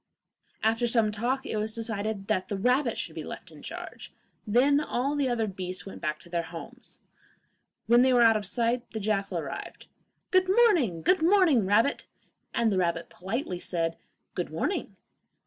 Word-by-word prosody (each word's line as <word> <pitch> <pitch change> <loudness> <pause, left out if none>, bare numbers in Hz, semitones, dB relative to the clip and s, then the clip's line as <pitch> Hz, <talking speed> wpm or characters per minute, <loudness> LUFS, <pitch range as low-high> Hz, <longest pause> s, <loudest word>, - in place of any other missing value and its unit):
After 225 +2 +2
some 230 -2 +3
talk 245 +5 -1
it - - -2
was 215 +1 -2
decided 220 -3 -2
that 195 -3 0
the 200 - -3
rabbit 250 +4 +2
should - - -4
be - - -5
left - - -8
in - - -13
charge; - - -8 0.4
then 265 +7 +4
all 280 -1 -1
the 280 -3 +1
other 235 -2 +1
beasts 185 -3 -5
went 195 - -9
back 155 -2 -1
to - - -16
their 170 0 0
homes. 175 +10 -9 0.9
When 240 +2 +5
they 260 +1 +4
were 245 -1 +5
out 225 -1 +6
of 210 -2 -2
sight 235 +3 0
the 220 - -3
jackal 200 -1 -1
arrived. - - -6 0.5
'Good 370 0 +4
morning! 350 - +3
Good 370 -2 +3
morning, 330 - +4
rabbit!' 225 +8 +2 0.4
and 235 -2 +1
the 190 - +1
rabbit 170 -2 -1
politely 190 0 -4
said, 165 -2 -2 0.4
'Good - - -3
morning! - - -2
225 Hz, 175 wpm, -28 LUFS, 195-255 Hz, 0.9 s, out